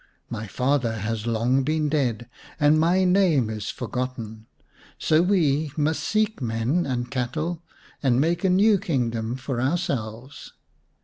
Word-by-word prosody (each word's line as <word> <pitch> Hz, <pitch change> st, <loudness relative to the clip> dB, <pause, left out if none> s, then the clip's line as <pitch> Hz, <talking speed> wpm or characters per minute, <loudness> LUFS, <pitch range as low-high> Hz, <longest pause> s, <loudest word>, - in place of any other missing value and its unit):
My 110 Hz, +1 st, -4 dB
father 125 Hz, +1 st, 0 dB
has 110 Hz, +1 st, -3 dB
long 120 Hz, +4 st, +2 dB
been 155 Hz, +2 st, 0 dB
dead 125 Hz, -6 st, -1 dB, 0.3 s
and 150 Hz, +1 st, +4 dB
my 175 Hz, +4 st, +3 dB
name 180 Hz, -, +3 dB
is 105 Hz, -2 st, -5 dB
forgotten, 115 Hz, -4 st, -5 dB, 0.5 s
so 155 Hz, +1 st, +3 dB
we 160 Hz, -6 st, +2 dB
must 155 Hz, +1 st, 0 dB
seek 215 Hz, -4 st, 0 dB
men 120 Hz, +9 st, 0 dB
and 120 Hz, -1 st, -3 dB
cattle 155 Hz, +6 st, -2 dB, 0.4 s
and 130 Hz, -3 st, +2 dB
make 170 Hz, +4 st, +1 dB
a 190 Hz, -, +3 dB
new 200 Hz, +2 st, +4 dB
kingdom 120 Hz, -, -1 dB
for 130 Hz, -2 st, -3 dB
ourselves. 130 Hz, -5 st, -3 dB
135 Hz, 135 wpm, -24 LUFS, 120-165 Hz, 0.5 s, and